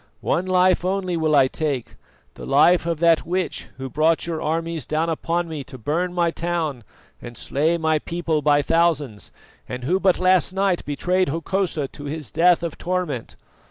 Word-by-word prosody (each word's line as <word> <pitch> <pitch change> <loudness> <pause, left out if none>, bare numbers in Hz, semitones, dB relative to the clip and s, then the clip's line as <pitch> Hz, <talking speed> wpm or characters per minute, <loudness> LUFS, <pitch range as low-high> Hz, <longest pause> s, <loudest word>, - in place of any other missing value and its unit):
One 180 +2 0
life 185 -1 +3
only 185 -1 -1
will 160 -2 +1
I 135 -2 +5
take, 140 -4 -3 0.4
the - - -11
life 170 +5 +4
of 165 -2 -1
that 170 -1 +4
witch 180 0 -3
who 135 0 -5
brought 155 +4 +1
your 165 -2 -3
armies 165 0 -2
down 160 +2 0
upon 170 +2 -1
me 155 -3 -5
to 130 -1 -11
burn 160 +10 -1
my 175 -1 +1
town 165 -7 -2 0.4
and 120 -1 -9
slay 160 +5 0
my 160 -1 +1
people 165 -1 -2
by 145 0 +3
thousands, 150 -10 0 0.4
and 125 0 -5
who 180 +9 +1
but 190 -2 +3
last 185 0 +3
night 190 -2 0
betrayed 180 +5 0
Hokosa 165 -1 -1
to 145 - -10
his 145 -5 -5
death 170 +3 +3
of 165 -3 -5
torment. 175 -9 -3
165 Hz, 175 wpm, -22 LUFS, 150-175 Hz, 0.4 s, I